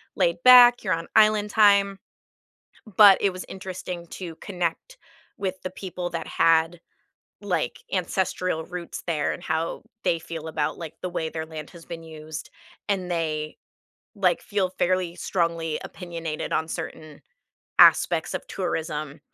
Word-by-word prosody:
laid-back, 245 Hz, +8 st, +7 dB
you're 185 Hz, -4 st, +1 dB
on 165 Hz, 0 st, -3 dB
island 215 Hz, -1 st, +5 dB
time, 200 Hz, -2 st, +4 dB, 1.0 s
but 205 Hz, -3 st, +9 dB
it 195 Hz, -2 st, +2 dB
was 185 Hz, -, -7 dB
interesting 180 Hz, -2 st, -6 dB
to 170 Hz, -4 st, -7 dB
connect 185 Hz, -, -4 dB, 0.4 s
with 190 Hz, -2 st, -2 dB
the 185 Hz, -, -4 dB
people 180 Hz, -2 st, -6 dB
that 165 Hz, -1 st, -4 dB
had, 165 Hz, +1 st, +3 dB, 0.6 s
like, -, -, -2 dB
ancestral 185 Hz, -3 st, -1 dB
roots 180 Hz, 0 st, -7 dB
there 160 Hz, -3 st, 0 dB
and 175 Hz, -, -9 dB
how 160 Hz, +1 st, -2 dB, 0.2 s
they 170 Hz, -, +3 dB
feel 160 Hz, -1 st, -7 dB
about, 155 Hz, -2 st, -2 dB
like, 165 Hz, -3 st, -7 dB
the 180 Hz, -, -3 dB
way 165 Hz, -2 st, -2 dB
their 160 Hz, 0 st, -5 dB
land 155 Hz, -1 st, -8 dB
has 170 Hz, -2 st, -14 dB
been 170 Hz, -1 st, -7 dB
used, 155 Hz, -1 st, -8 dB, 0.4 s
and 185 Hz, -3 st, -1 dB
they, 155 Hz, -2 st, -2 dB, 0.6 s
like, 185 Hz, -4 st, +2 dB
feel 195 Hz, -3 st, -1 dB
fairly 180 Hz, -1 st, +1 dB
strongly 165 Hz, -4 st, -1 dB
opinionated 165 Hz, -4 st, -5 dB
on 160 Hz, -, +1 dB
certain 155 Hz, -2 st, -7 dB, 0.6 s
aspects -, -, +5 dB
of -, -, -5 dB
tourism, 150 Hz, -2 st, -3 dB
170 Hz, 140 wpm, -25 LUFS, 160-190 Hz, 1.0 s, but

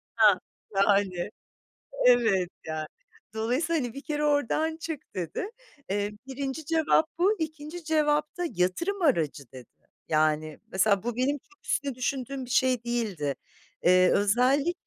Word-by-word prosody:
Hah, 210 Hz, -4 st, +6 dB, 0.4 s
yani. 195 Hz, -3 st, +2 dB, 0.8 s
Evet, 225 Hz, -8 st, +4 dB, 0.2 s
yani, 155 Hz, -1 st, -3 dB, 0.5 s
dolayısıyla, 270 Hz, +9 st, 0 dB
hani, 240 Hz, -2 st, -4 dB
"Bir 275 Hz, -, -7 dB
kere 300 Hz, -1 st, -2 dB
oradan 295 Hz, +2 st, +1 dB
çık." 325 Hz, -3 st, -7 dB
dedi. 185 Hz, -, -3 dB, 0.4 s
Eee, 205 Hz, +1 st, -1 dB
1'inci 270 Hz, +3 st, -4 dB
cevap 320 Hz, 0 st, +3 dB
bu, 395 Hz, +5 st, +3 dB
2'nci 315 Hz, +1 st, -5 dB
cevap 300 Hz, -1 st, +1 dB
da 355 Hz, -, -2 dB
yatırım 340 Hz, -, 0 dB
aracı, 165 Hz, -, +2 dB
dedi. 130 Hz, -2 st, -11 dB, 0.4 s
Yani, 155 Hz, 0 st, +1 dB
mesela 195 Hz, +1 st, +3 dB
bu 235 Hz, -1 st, -3 dB
benim 275 Hz, +4 st, +1 dB
çok 390 Hz, +8 st, -27 dB
üstüne 280 Hz, -2 st, 0 dB
düşündüğüm 260 Hz, +1 st, -3 dB
bir 245 Hz, -, -12 dB
şey 250 Hz, -1 st, +2 dB
değildi. 205 Hz, -, -1 dB, 0.5 s
Eee, 185 Hz, +1 st, +5 dB
özellikle, 255 Hz, -, +3 dB
250 Hz, 135 wpm, -27 LUFS, 195-300 Hz, 0.8 s, Hah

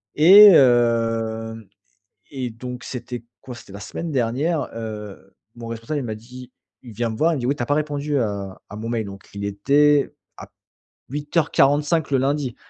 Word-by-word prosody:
et 190 Hz, +7 st, +9 dB
hem 115 Hz, -3 st, +2 dB, 0.7 s
et 130 Hz, -3 st, -4 dB
donc 125 Hz, +2 st, -8 dB
c'était 120 Hz, -1 st, -7 dB, 0.2 s
quoi? 125 Hz, -, -9 dB
C'était 110 Hz, -4 st, -14 dB
la 100 Hz, -, -8 dB
semaine 165 Hz, +9 st, -6 dB
dernière, 140 Hz, +5 st, -1 dB
heu, 105 Hz, -3 st, -8 dB, 0.2 s
mon 115 Hz, -1 st, -9 dB
responsable, 115 Hz, +6 st, -4 dB
il -, -, -5 dB
m'a 110 Hz, -2 st, -4 dB
dit 125 Hz, +3 st, -12 dB, 0.3 s
il 120 Hz, -4 st, -11 dB
vient 115 Hz, +1 st, -2 dB
me 110 Hz, -, -6 dB
voir, 165 Hz, +2 st, +2 dB
il 155 Hz, -, -2 dB
me -, -, -5 dB
dit: 120 Hz, -, -3 dB
«Oui, 140 Hz, -, +1 dB
tu 120 Hz, -, -2 dB
as -, -, -5 dB
pas 145 Hz, -, +2 dB
répondu 145 Hz, -1 st, -2 dB
à 100 Hz, -4 st, -4 dB
à -, -, -9 dB
mon 110 Hz, +1 st, -6 dB
mail». 115 Hz, -2 st, -1 dB
Donc 100 Hz, -1 st, -10 dB
il 100 Hz, -, -5 dB
était 140 Hz, +8 st, +2 dB, 0.2 s
à -, -, -10 dB
p -, -, -42 dB, 0.6 s
08:45 150 Hz, +1 st, +1 dB
le 135 Hz, -, +3 dB
lundi. 135 Hz, -2 st, -1 dB
125 Hz, 190 wpm, -22 LUFS, 115-145 Hz, 0.7 s, et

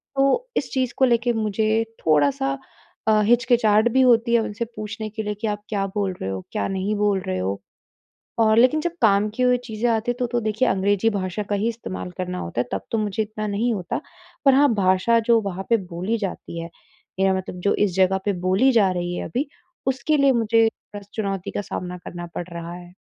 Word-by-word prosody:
तो 275 Hz, -, +2 dB
इस 265 Hz, -, -2 dB
चीज़ 255 Hz, -2 st, 0 dB
को 265 Hz, -, +5 dB
लेके 240 Hz, -1 st, +2 dB
मुझे 220 Hz, 0 st, +1 dB, 0.2 s
थोड़ा-सा 140 Hz, -3 st, +2 dB, 0.5 s
अ, 215 Hz, -1 st, +5 dB
हिचकिचाहट 235 Hz, -2 st, +4 dB
भी 265 Hz, +2 st, +4 dB
होती 235 Hz, -2 st, +4 dB
है 235 Hz, -, +6 dB
उनसे 220 Hz, +1 st, -3 dB
पूछने 215 Hz, +1 st, -5 dB
के 220 Hz, +1 st, -5 dB
लिए 210 Hz, 0 st, -2 dB
कि 225 Hz, -, 0 dB
आप 205 Hz, -1 st, -2 dB
क्या 200 Hz, -2 st, 0 dB
बोल 200 Hz, -2 st, 0 dB
रहे 95 Hz, -, -2 dB
हो? 95 Hz, -1 st, -4 dB
क्या 100 Hz, -, -1 dB
नहीं 195 Hz, +2 st, -1 dB
बोल 205 Hz, -1 st, +2 dB
रहे 95 Hz, -, -1 dB
हो? 95 Hz, +2 st, -2 dB, 0.8 s
और 220 Hz, -1 st, +4 dB
लेकिन 255 Hz, +6 st, +5 dB
जब 345 Hz, -, -1 dB
काम 205 Hz, -1 st, +4 dB
की 255 Hz, -, 0 dB
हुई 250 Hz, 0 st, +4 dB
चीज़ें 225 Hz, +1 st, -1 dB
आती 225 Hz, +1 st, +1 dB
हैं 245 Hz, -, -6 dB
तो, 250 Hz, -, 0 dB
तो 240 Hz, 0 st, 0 dB
देखिए 215 Hz, +3 st, 0 dB
अंग्रेजी 200 Hz, +3 st, +2 dB
भाषा 195 Hz, -1 st, -3 dB
का 205 Hz, -, +1 dB
ही 205 Hz, +3 st, 0 dB
इस्तेमाल 220 Hz, -5 st, -6 dB
करना 180 Hz, -1 st, -3 dB
होता 85 Hz, +8 st, -2 dB
है, 125 Hz, -, -5 dB
तब -, -, -2 dB
तो 225 Hz, -, +1 dB
मुझे 215 Hz, 0 st, 0 dB
इतना 215 Hz, 0 st, -5 dB
नहीं 220 Hz, +4 st, 0 dB
होता 185 Hz, -5 st, -3 dB, 0.4 s
पर 275 Hz, -, +7 dB
हाँ, 280 Hz, -1 st, +5 dB
भाषा 195 Hz, +3 st, +3 dB
जो 230 Hz, -1 st, +6 dB
वहाँ 190 Hz, -2 st, -5 dB
पे 230 Hz, -, +5 dB, 0.2 s
बोली 185 Hz, +7 st, -1 dB
जाती 190 Hz, -4 st, -5 dB
है, 165 Hz, -, -7 dB, 0.5 s
मेरा 190 Hz, 0 st, +3 dB
मतलब 185 Hz, -1 st, -6 dB
जो -, -, +3 dB
इस 185 Hz, -3 st, -3 dB
जगह 190 Hz, 0 st, +3 dB
पे 205 Hz, -, +1 dB
बोली 210 Hz, +9 st, +4 dB
जा 210 Hz, -6 st, +4 dB
रही 175 Hz, -1 st, -2 dB
है -, -, -4 dB
अभी, 270 Hz, +5 st, -1 dB, 0.4 s
उसके 270 Hz, +4 st, +1 dB
लिए 275 Hz, -1 st, +5 dB
मुझे 225 Hz, -2 st, +3 dB, 0.3 s
बस 205 Hz, -1 st, -9 dB
चुनौती 195 Hz, -3 st, -3 dB
का -, -, -2 dB
सामना 180 Hz, -2 st, -5 dB
करना 175 Hz, 0 st, -6 dB
पड़ 175 Hz, -, -4 dB
रहा 170 Hz, 0 st, -6 dB
है। 175 Hz, 0 st, -11 dB
210 Hz, 220 wpm, -23 LUFS, 185-235 Hz, 0.8 s, पर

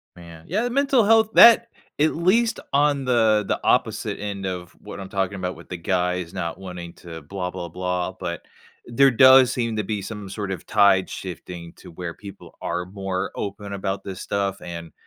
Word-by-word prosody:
Man, 85 Hz, -2 st, -13 dB
yeah, 205 Hz, +7 st, 0 dB
the 245 Hz, -, -1 dB
mental 270 Hz, -1 st, +3 dB
health 220 Hz, +1 st, +4 dB
that 235 Hz, 0 st, +8 dB, 0.3 s
at 155 Hz, +1 st, +2 dB
least 225 Hz, +7 st, +2 dB
on 140 Hz, -1 st, +2 dB
the 110 Hz, -4 st, +3 dB
the -, -, -1 dB
opposite -, -, 0 dB
end 100 Hz, -1 st, -5 dB
of 90 Hz, -2 st, -5 dB
what -, -, -9 dB
I'm 95 Hz, -1 st, -8 dB
talking 95 Hz, 0 st, -1 dB
about 90 Hz, -1 st, -4 dB
with -, -, -15 dB
the 90 Hz, -, -5 dB
guys 90 Hz, 0 st, -1 dB
not 85 Hz, -2 st, -4 dB
wanting 90 Hz, -3 st, -8 dB
to 80 Hz, -2 st, -10 dB
blah, 90 Hz, +3 st, -5 dB
blah, 90 Hz, -2 st, -6 dB
blah, 90 Hz, +1 st, -3 dB
but 85 Hz, -1 st, -4 dB, 0.4 s
there 135 Hz, +3 st, +4 dB
does 130 Hz, +1 st, +7 dB
seem 115 Hz, -3 st, -2 dB
to 105 Hz, -, -1 dB
be 105 Hz, 0 st, -3 dB
some 105 Hz, 0 st, -7 dB
sort 100 Hz, 0 st, -5 dB
of 95 Hz, -, -6 dB
tide 100 Hz, -3 st, +4 dB
shifting 90 Hz, -2 st, -8 dB
to -, -, -14 dB
where 85 Hz, 0 st, -6 dB
people 100 Hz, +2 st, -12 dB
are 90 Hz, +1 st, -3 dB
more 95 Hz, 0 st, -4 dB
open 100 Hz, 0 st, -5 dB
about 95 Hz, 0 st, -3 dB
this 95 Hz, -1 st, -7 dB
stuff 100 Hz, -1 st, -2 dB
and 85 Hz, -1 st, -8 dB
95 Hz, 190 wpm, -23 LUFS, 90-120 Hz, 0.4 s, that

